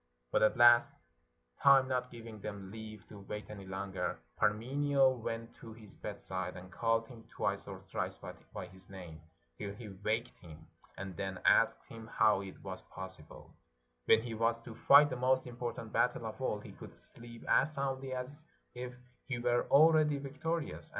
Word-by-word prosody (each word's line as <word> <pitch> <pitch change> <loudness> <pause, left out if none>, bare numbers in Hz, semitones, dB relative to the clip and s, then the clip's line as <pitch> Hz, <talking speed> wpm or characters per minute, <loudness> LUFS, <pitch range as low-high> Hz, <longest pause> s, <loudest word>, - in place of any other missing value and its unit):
But - - +3
at 110 +4 +4
last, 120 0 +7 0.7
time 135 -1 +7
not 125 -1 -1
gi^■ing 115 -3 -9
them 100 -2 -6
leave 110 -1 -9
to 105 - -10
wait 105 +2 -7
any 100 -2 -9
longer, 95 0 -3 0.2
Parmenio 135 +6 +3
went 115 -1 -5
to 115 - -10
his 110 -2 -14
bedside, 95 -3 -5
and 90 +1 -11
called 115 0 +1
him 115 -2 -12
t'VN'ice - - -2
or - - -7
thrice - - -3
by - - -9
his 95 0 -12
name, 90 -5 -9 0.4
till 100 -1 -5
he 110 0 -9
waked 105 +5 -2
him, 80 -2 -13 0.3
and 95 -2 -6
then 95 -1 -3
asked - - +4
him 115 -1 -10
how 110 -3 +3
it 95 -1 -10
was - - -6
possible, 95 -5 -10 0.5
when 110 0 +5
he 120 -2 -5
was 115 +1 +1
to 115 - -8
fight 145 +5 +7
the - - -1
most 130 +1 +2
important 120 -1 -5
battle - - +2
of - - -6
all, - - 0
he - - -11
could - - -11
sleep 115 0 -7
as 155 - +4
soundly 135 -1 -2
as 130 +4 -5 0.3
if 125 0 -6 0.3
he 130 -3 -2
were 120 0 +1
already 155 0 +6
vic 140 +1 -9
torious. 160 -1 -2
115 Hz, 175 wpm, -34 LUFS, 100-130 Hz, 0.7 s, last